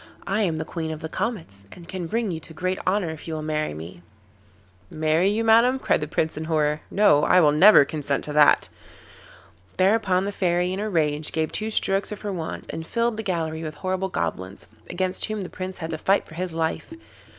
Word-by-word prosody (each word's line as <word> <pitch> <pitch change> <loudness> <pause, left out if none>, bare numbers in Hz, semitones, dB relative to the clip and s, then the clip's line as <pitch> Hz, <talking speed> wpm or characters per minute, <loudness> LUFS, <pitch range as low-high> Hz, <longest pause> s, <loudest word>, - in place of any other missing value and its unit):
I 200 +3 0
am 170 -6 0
the 160 - -3
Queen 160 -1 -4
of 155 0 -6
the 160 - -5
Comets, 160 - -4
and 170 -1 -13
can 180 -3 -5
bring 225 +2 -1
you 160 - -4
to 160 0 -12
great 185 +2 -2
honour 185 -3 +1
if 160 0 -10
you 160 - -3
will 155 - -5
marry 155 - -2
me.' 85 +3 -9 0.9
'Marry 155 +3 +1
you, 215 +2 0
Madam,' 230 +3 +5
cried 260 - 0
the 150 - -3
Prince, 160 +1 -1
in 155 - -4
horror. 150 -1 0
'No, 190 -8 +4
I 180 - +5
will 150 -4 +5
never 155 0 +7
consent 140 -2 -3
to 150 - -5
that.' 150 -1 +5 1.1
Thereupon 190 -1 +2
the 200 - -2
Fairy, 180 -2 0
in 190 - -4
a 215 +1 -2
rage, 155 -4 0
gave 160 0 -1
two 215 +1 -2
strokes 195 -1 +1
of 210 - -6
her 205 -2 -4
wand 165 -3 -5
and 160 - -5
filled 230 +6 -1
the 220 - -3
gallery 165 -5 -2
with 155 -1 -6
horrible 185 +2 -2
goblins, 95 - -4 0.2
against 185 +1 -1
whom 215 -1 -4
the 180 - -7
Prince 185 0 -6
had 165 -1 -5
to 160 - -4
fight 195 +4 +2
for - - -14
his 180 +2 -3
life. 160 - -2
170 Hz, 215 wpm, -24 LUFS, 155-195 Hz, 1.1 s, never